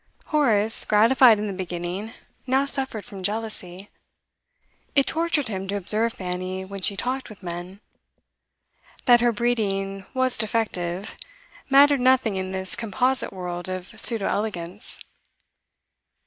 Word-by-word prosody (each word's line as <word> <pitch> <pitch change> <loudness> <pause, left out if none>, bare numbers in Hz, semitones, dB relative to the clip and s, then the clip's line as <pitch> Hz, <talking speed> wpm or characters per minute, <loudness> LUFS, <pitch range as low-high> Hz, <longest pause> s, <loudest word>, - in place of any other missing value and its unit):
Horace, 225 -8 +3
gratified 230 +2 +6
in 210 - -3
the 200 - -3
beginning, 185 +3 -5 0.3
now 265 +2 +3
suffered 265 -6 -2
from 200 -5 -9
jealousy; 205 -2 -4 1.0
it 275 -1 +5
tortured 325 -4 0
him 195 -3 -4
to 200 - -2
observe 215 +4 +1
Fanny 185 +1 -4
when 195 0 -7
she 200 - 0
talked 255 +4 -2
with 205 -3 -13
men. 175 +3 -7 1.2
That 240 -1 +6
her 240 0 +4
breeding 195 -4 -1
was 260 -1 +1
defective, 205 -4 -2 0.5
mattered 280 0 +6
nothing 255 -5 +3
in 185 0 -3
this 190 -1 -1
composite 250 +3 0
world 180 -1 -5
of 185 0 -5
pseudo 225 -5 +3
elegance. 200 -2 -3
210 Hz, 125 wpm, -24 LUFS, 185-245 Hz, 1.2 s, gratified